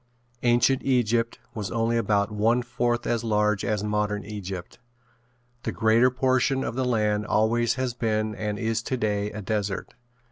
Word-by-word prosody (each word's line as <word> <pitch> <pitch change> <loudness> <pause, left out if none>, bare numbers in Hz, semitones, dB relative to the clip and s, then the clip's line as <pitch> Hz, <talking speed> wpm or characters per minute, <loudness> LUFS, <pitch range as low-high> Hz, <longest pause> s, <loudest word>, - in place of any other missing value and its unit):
Ancient 120 +2 +3
Egypt 120 -3 +1 0.2
was 105 -4 -4
only 115 0 0
about 105 -2 +1
one 115 +4 +2
fourth 120 0 -1
as 115 -1 0
large 105 -2 +1
as 105 -1 -1
modern 105 0 -1
Egypt. 95 -4 -7 0.8
The - - -3
greater 115 +3 +4
portion 130 +1 +1
of - - -3
the 130 +1 -1
land 105 -3 +1
always 115 +2 +2
has 130 -2 -2
been 110 -2 -1
and 105 -1 -3
is 115 0 -1
today 105 -5 -1
a 105 0 -7
desert. 105 -1 -2
110 Hz, 150 wpm, -26 LUFS, 105-120 Hz, 0.8 s, greater